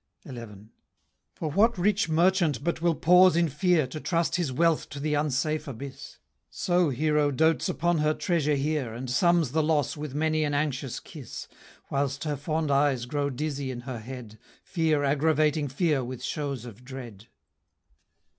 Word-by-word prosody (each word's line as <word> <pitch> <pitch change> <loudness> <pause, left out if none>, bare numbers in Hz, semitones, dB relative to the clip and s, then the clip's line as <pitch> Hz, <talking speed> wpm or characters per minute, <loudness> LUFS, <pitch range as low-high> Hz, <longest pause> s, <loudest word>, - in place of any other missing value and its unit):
XI. 120 -4 -7 0.9
For 155 -2 -3
what 220 +8 +3
rich 205 +1 +1
merchant 165 -4 +2
but 170 0 -1
will 170 -1 +2
pause 180 +3 +6
in 170 0 +3
fear, 155 +2 +2
To 140 +5 -7
trust 170 +1 0
his 170 -7 -1
wealth 165 +4 +1
to 140 - -7
the 150 +1 -1
unsafe 150 +1 0
abyss? 135 +1 -8 0.3
So 175 -2 +1
Hero 150 +2 +1
dotes 160 +3 +2
upon 170 -1 +1
her 155 0 +2
treasure 150 -4 +1
here, 140 -5 -1
And 125 +1 -5
sums 170 0 +3
the 160 - +2
loss 150 -3 +1
with 145 -2 -6
many 155 +1 +1
an 145 -1 0
anxious 140 -3 -2
kiss, 145 -7 -9 0.4
Whilst 140 0 -1
her 150 -2 -1
fond 155 +2 -2
eyes 140 -3 +2
grow 140 +2 -1
dizzy 140 0 -3
in 125 -2 -5
her 125 -2 -6
head, 115 -2 -9 0.2
Fear 160 -4 +1
aggravating 150 +1 +2
fear 145 0 0
with 125 0 -7
shows 140 -6 -3
of 120 0 -11
dread. 120 -5 -9
150 Hz, 165 wpm, -27 LUFS, 135-160 Hz, 0.9 s, pause